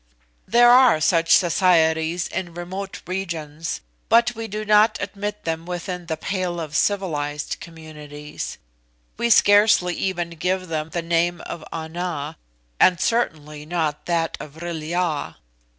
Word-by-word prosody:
"There 240 0 +6
are 250 -9 +6
such 165 +1 +2
societies 170 -2 +3
in 175 -3 -5
remote 190 +3 -6
regions, 165 -4 -4 0.3
but 235 +1 +4
we 225 -1 -6
do 215 +1 -5
not 210 +1 +4
admit 205 +1 -5
them 165 +1 -3
within 180 0 -5
the 160 -1 -2
pale 180 0 -2
of 155 -3 -6
civilised 150 -7 -1
communities; 150 -2 -8 0.6
we 235 - 0
scarcely 205 -4 +5
even 175 -2 -2
give 180 +2 -2
them 155 -1 -2
the 170 0 -3
name 170 +1 +1
of 160 - -7
Ana, 160 -2 -4 0.4
and 180 -2 +5
certainly 150 -10 -1
not 155 -2 -2
that 170 -1 0
of 150 - -9
Vril 165 0 -5
ya. 165 -1 -2
175 Hz, 135 wpm, -22 LUFS, 160-190 Hz, 0.6 s, There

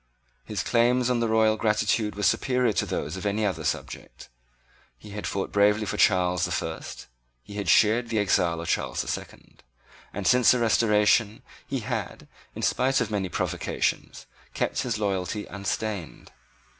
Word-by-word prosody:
His - - -4
claims 125 +1 +2
on 120 - +1
the 115 - +1
royal 110 0 +3
gratitude 105 -1 0
were 105 - -4
superior 125 +1 +2
to - - -1
those 75 +3 -3
of 95 - -7
any 105 +1 0
other 90 -6 -2
subject. 75 - -5 0.7
He 100 - -13
had 105 +1 -5
fought 95 -1 -3
bravely 105 +1 +3
for - - -3
Charles 90 -3 +3
the 90 - -5
First: 80 -2 -5 0.4
he 100 - -12
had 100 -3 -3
shared 115 +6 +4
the 115 - -1
exile 90 -4 +1
of 85 - -7
Charles - - -1
the - - -12
Second; - - -7 0.5
and, 100 -1 -5
since 125 +2 +5
the 125 - +5
Restoration, 110 -1 +2 0.2
he - - -3
had, - - -5 0.3
in - - -6
spite 135 +1 +2
of 115 -3 -2
many 100 -3 -1
provocations, - - -2 0.3
kept - - -1
his 125 -4 -2
loyalty 100 0 -2
unstained. 100 -2 -5
105 Hz, 165 wpm, -26 LUFS, 95-115 Hz, 0.7 s, since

